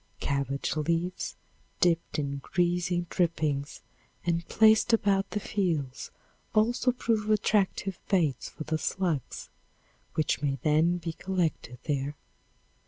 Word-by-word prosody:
Cabbage 140 0 -1
leaves 165 +4 -1 0.4
dipped 170 -1 +2
in 140 -2 -2
grease 175 +4 0 0.2
drippings 155 -5 0 0.4
and 170 -1 +1
placed 220 +2 +5
about 200 -3 +3
the 210 - -2
fields 165 -11 -2 0.5
also 240 +4 +3
prove 225 -3 -1
attractive 200 -3 +1
bait 155 -10 +1
for - - -5
the 155 0 -1
slugs, 170 -9 -2 0.6
which 155 -3 +1
may 140 -2 0
then 160 +3 +3
be 165 -1 -4
collected 170 -9 -2
there. 145 -1 -1
170 Hz, 110 wpm, -29 LUFS, 150-195 Hz, 0.6 s, placed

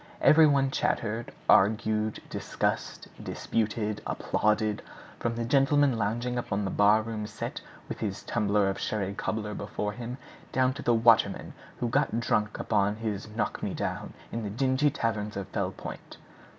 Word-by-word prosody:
Every 155 0 +7
one 135 -2 +3
chattered, 115 -2 -1 0.2
argued, 110 +1 +3
discussed, - - -2 0.2
disputed, 110 -1 -2
applauded, 105 0 0 0.4
from 115 0 -1
the 115 0 -2
gentleman 135 +1 +4
lounging 120 +3 -1
upon 105 -3 -2
the 95 - -2
barroom 105 +1 +2
settee 110 +1 -5 0.3
with - - -6
his 100 -2 -3
tumbler 105 -2 +1
of 95 0 -2
sherry 100 -1 -2
cobbler 105 +1 -3
before 105 0 -3
him 120 +2 -6 0.3
down 130 0 +2
to 140 - -7
the 120 - +3
waterman 115 -3 +3 0.3
who 120 - 0
got 130 -1 +1
drunk 105 -2 0
upon 105 -1 +1
his 110 -2 -4
"knock 115 - -1
me - - -2
down" - - -4 0.2
in 115 - -3
the 105 - -3
dingy 130 +6 +2
taverns 110 -7 -2
of 100 - -4
Fell - - -1
Point. - - -9
110 Hz, 150 wpm, -28 LUFS, 105-120 Hz, 0.4 s, Every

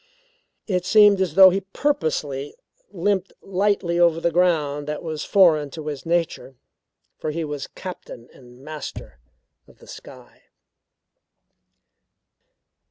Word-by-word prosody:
It 180 -4 -1
seemed 205 0 +5
as 175 -5 -1
though 190 -1 +9
he 195 +2 -1
purposely 160 - -2 0.3
limped 195 0 -1
lightly 195 -3 0
over 170 -2 +3
the 170 0 0
ground 155 -5 0
that 150 0 -5
was 155 -3 -5
foreign 160 -7 +3
to 155 - -7
his 150 +1 -6
nature; 165 -5 -2 0.6
for - - -3
he 160 +1 -3
was 145 -2 -6
captain 180 -10 -10
and 125 0 -17
master 150 - -8 0.5
of - - -21
the - - -18
sky. - - -14
170 Hz, 120 wpm, -22 LUFS, 150-190 Hz, 0.6 s, though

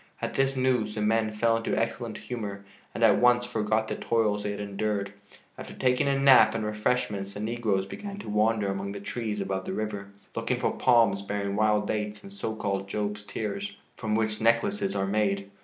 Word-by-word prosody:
At - - -3
this 135 0 +1
news 125 -5 +1
the 105 - -2
men 110 0 +2
fell 115 +2 +2
into 115 - -1
excellent 115 0 -2
humor 100 -5 -6 0.3
and - - -1
at - - +6
once 120 0 +4
forgot 110 -2 0
the - - -2
toils 110 -3 +1
they 105 - -3
had 100 0 -4
endured. 100 0 -2 0.5
After - - -8
taking 125 +1 +2
a 140 0 +2
nap 135 -4 +6
and 110 -1 -1
refreshments 105 -2 -1
the - - -5
negroes 110 -3 0
began 200 - -7
to 205 - -9
wander 105 -1 +2
among 100 0 -4
the 100 - -6
trees 105 0 -3
above 95 -1 -2
the - - -3
river, 105 -2 -3 0.3
looking - - -1
for - - 0
palms 115 -6 +4
bearing 100 0 -2
wild 105 0 +2
dates 105 - -3
and 195 0 -11
so 110 - -4
called 100 -2 -2
"Job's 105 +1 -3
tears," 100 -1 -4 0.2
from 110 -2 -2
which 110 -1 0
necklaces 195 - +2
are 95 - +1
made. 100 -1 0
105 Hz, 195 wpm, -27 LUFS, 100-115 Hz, 0.5 s, at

